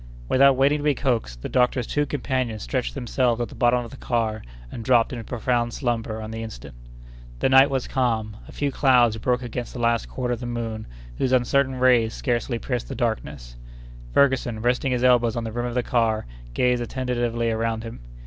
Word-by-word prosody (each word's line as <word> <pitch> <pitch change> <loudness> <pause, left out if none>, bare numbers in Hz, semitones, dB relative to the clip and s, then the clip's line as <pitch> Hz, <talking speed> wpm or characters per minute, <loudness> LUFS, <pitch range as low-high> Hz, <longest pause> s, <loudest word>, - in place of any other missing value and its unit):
Without 135 - +5
waiting 140 +3 +3
to - - -5
be 150 -2 +2
coaxed, 115 - -2
the - - -2
doctor's 125 -1 +1
two 145 +4 -1
companions 130 -5 -2
stretched - - -2
themselves 120 -1 0
at 120 - -2
the - - -12
bottom 120 0 +2
of - - -11
the 135 - -10
car 115 -4 -1 0.3
and 115 - -6
dropped 120 +1 +3
into 120 -2 -5
profound 120 0 -1
slumber 115 -4 -2
on 110 - -7
the 110 0 -5
instant. 70 - -8 0.6
The 130 - +1
night 135 +1 +7
was 135 -2 -2
calm. 115 -5 -1
A - - -11
few 145 -1 -2
clouds 125 -5 +4
broke 125 +3 0
against 120 0 -5
the 125 - -7
last 115 -1 +1
quarter 125 -1 -2
of 120 - -4
the 120 - -5
moon, 115 -2 -4 0.3
whose 130 - +1
uncertain 130 +1 +2
rays 125 -3 +3
scarcely 120 -1 -1
pierced 125 0 -3
the - - -6
darkness. 70 - -3 0.5
Ferguson, 130 - +2
resting 125 +2 +1
his 125 0 0
elbows 120 -2 +4
on 120 - -2
the 110 - -4
rim 120 +2 -2
of 120 - -5
the 125 - +1
car, 115 -3 +1 0.3
gazed 125 -1 +2
attentively 120 -2 -1
around 115 0 -1
him. 115 0 -8
120 Hz, 200 wpm, -24 LUFS, 115-130 Hz, 0.6 s, night